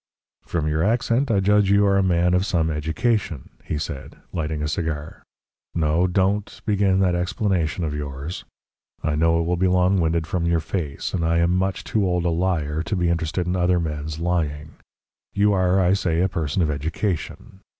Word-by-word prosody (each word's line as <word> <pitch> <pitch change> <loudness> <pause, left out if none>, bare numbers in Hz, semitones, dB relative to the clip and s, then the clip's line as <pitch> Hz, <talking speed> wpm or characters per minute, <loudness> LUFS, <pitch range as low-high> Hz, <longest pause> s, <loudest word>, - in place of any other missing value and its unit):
"From 80 -3 -1
your 75 +1 0
accent 120 +5 +1
I 100 -4 +2
judge 105 0 +3
you 100 +1 +4
are 100 -1 +3
a 100 - +4
man 90 -1 +2
of 90 +1 +3
some 85 -5 0
education," 80 - -1
he 75 - -3
said, 70 -2 -6 0.2
lighting 75 -2 -2
a - - 0
cigar. 80 -1 -4 0.5
"No 80 +2 +2
DON'T 100 +3 0
begin 100 -3 +2
that 90 -2 +3
explanation 90 -1 -1
of 75 -2 -2
yours. 75 +3 -5 0.6
I 80 - 0
know 80 +2 +2
it - - +1
will 85 +1 0
be 95 +2 +2
long 90 +1 +3
winded 80 0 +1
from 85 +1 -1
your 85 -1 +2
face, 80 -3 -4
and 85 - -1
I 85 +1 +2
am 85 +1 +2
much 95 +1 -1
too 110 - 0
old 90 -2 0
a 85 - +2
liar 80 -3 0
to 100 - -2
be 90 -2 +1
interested 85 +1 -1
in 90 +1 -1
other 90 0 +2
men's 75 -1 -4
lying. 80 -3 -2 0.6
You 100 +1 +3
are, 95 0 +2
I 90 0 +3
say, 85 -4 +1
a 95 - +3
person 85 -2 -1
of 75 - +1
education. 85 +6 -4
85 Hz, 190 wpm, -23 LUFS, 80-95 Hz, 0.6 s, you